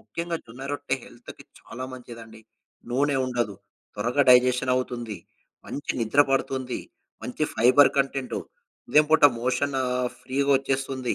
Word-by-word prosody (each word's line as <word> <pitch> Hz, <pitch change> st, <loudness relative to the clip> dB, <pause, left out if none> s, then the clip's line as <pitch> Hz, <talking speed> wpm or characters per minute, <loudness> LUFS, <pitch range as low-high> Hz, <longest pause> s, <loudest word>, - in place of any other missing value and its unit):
ముఖ్యంగా 170 Hz, 0 st, -4 dB
జొన్న 125 Hz, +4 st, -11 dB
రొట్టె 145 Hz, -, -2 dB
హెల్త్‌కి -, -, -13 dB, 0.2 s
చాలా 130 Hz, +2 st, -8 dB
మంచిదండి. 115 Hz, -3 st, -11 dB, 0.5 s
నూనె 140 Hz, +3 st, +1 dB
ఉండదు. 120 Hz, -5 st, -2 dB, 0.4 s
త్వరగా 120 Hz, +7 st, +1 dB
డైజెషన్ 125 Hz, +1 st, +4 dB
అవుతుంది. 120 Hz, -5 st, -4 dB, 0.5 s
మంచి 145 Hz, -, -4 dB
నిద్ర 115 Hz, +6 st, +3 dB
పడుతుంది. 130 Hz, -1 st, -1 dB, 0.4 s
మంచి 125 Hz, -, -5 dB
ఫైబర్ 125 Hz, +5 st, +6 dB
కంటెంటు, 135 Hz, -1 st, -1 dB, 0.5 s
ఉదయం 150 Hz, 0 st, +5 dB
పూట 160 Hz, -, +6 dB, 0.2 s
మోషన్ 130 Hz, +3 st, 0 dB, 0.4 s
ఫ్రీగొచ్చేస్తుంది. 135 Hz, -1 st, 0 dB
130 Hz, 115 wpm, -25 LUFS, 120-140 Hz, 0.5 s, ఫైబర్